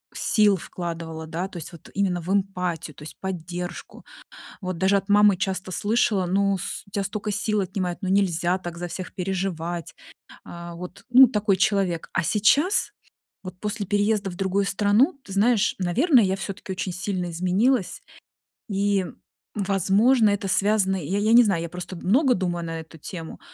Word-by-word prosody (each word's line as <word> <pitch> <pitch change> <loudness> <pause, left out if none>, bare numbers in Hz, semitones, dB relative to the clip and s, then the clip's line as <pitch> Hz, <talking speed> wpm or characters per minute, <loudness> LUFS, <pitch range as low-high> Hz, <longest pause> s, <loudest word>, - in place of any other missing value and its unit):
сил 210 -3 +3
вкладывала, 165 -2 -6
да, 170 +3 -4
то 195 - -10
есть 165 - -7
вот 170 - -14
именно 185 -3 0
в 180 - -4
эмпатию, 180 -5 -1
то - - -15
есть 155 - -10
поддержку. 175 -1 -6 0.6
Вот 185 -3 -4
даже 190 +1 +3
от 195 +1 -2
мамы 205 -1 +6
часто 190 -1 -3
слышала: 205 -1 +1
"Ну 200 +2 +2
с 185 - -5
у - - -20
тебя 200 0 -2
столько 210 +1 -3
сил 210 0 0
отнимает, 185 -2 -3
ну 190 - -3
нельзя 180 -3 +2
так 175 -2 -7
за 175 - -4
всех 185 +1 -7
переживать". 175 -3 -3 0.5
А, 170 0 -9
вот 180 +1 -9
ну 255 +2 +9
такой 210 -4 +1
человек. 190 -3 0
А 185 - +2
сейчас, 280 - +2 0.5
вот 185 -1 -9
после 210 0 -3
переезда 205 0 +1
в 175 - -9
другую 195 +1 0
страну, 215 - +2
ты 195 - -10
знаешь, 210 +2 +3
наверное, 235 - +3
я 190 0 0
всё-таки 195 0 -6
очень 185 0 -3
сильно 180 -1 -3
изменилась. 185 +6 +1 0.7
И, 200 -1 +1 0.5
возможно, 205 +4 +3
это 200 -1 -1
связано, 195 -1 +2
я 185 +7 -2
я 215 +2 +2
не 240 +1 +9
знаю, 190 -6 0
я 170 - -5
просто 180 +2 -7
много 250 - +3
думаю 175 -2 -2
на 165 0 -4
эту 160 0 -14
тему, 165 +1 -8
190 Hz, 170 wpm, -24 LUFS, 175-205 Hz, 0.7 s, ну